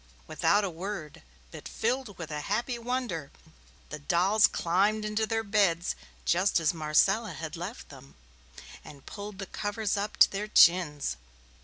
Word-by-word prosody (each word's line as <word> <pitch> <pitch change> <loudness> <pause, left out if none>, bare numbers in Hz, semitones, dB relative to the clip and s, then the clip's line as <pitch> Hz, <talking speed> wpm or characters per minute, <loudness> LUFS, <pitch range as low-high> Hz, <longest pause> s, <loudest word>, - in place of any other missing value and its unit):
Without 205 - +2
a 200 - -1
word, 170 -3 -7 0.3
but - - -9
filled 235 -3 -2
with 165 -2 -7
a 150 - -3
happy 240 - -2
wonder, 235 - -3 0.6
the 150 - -7
dolls 190 +7 +3
climbed 205 +5 0
into 215 +1 -1
their 225 +1 -1
beds, 195 -5 +1 0.3
just 185 +2 +2
as 165 +2 +1
Marcella 175 +7 +2
had 160 +1 -6
left 180 +8 -7
them, 135 -1 -14 0.7
and 140 -2 -13
pulled 205 -1 -8
the 195 - -5
covers 205 +1 -3
up 205 +1 -3
to - - +7
their 205 +2 -3
chins. 170 - +4
195 Hz, 150 wpm, -28 LUFS, 165-215 Hz, 0.7 s, to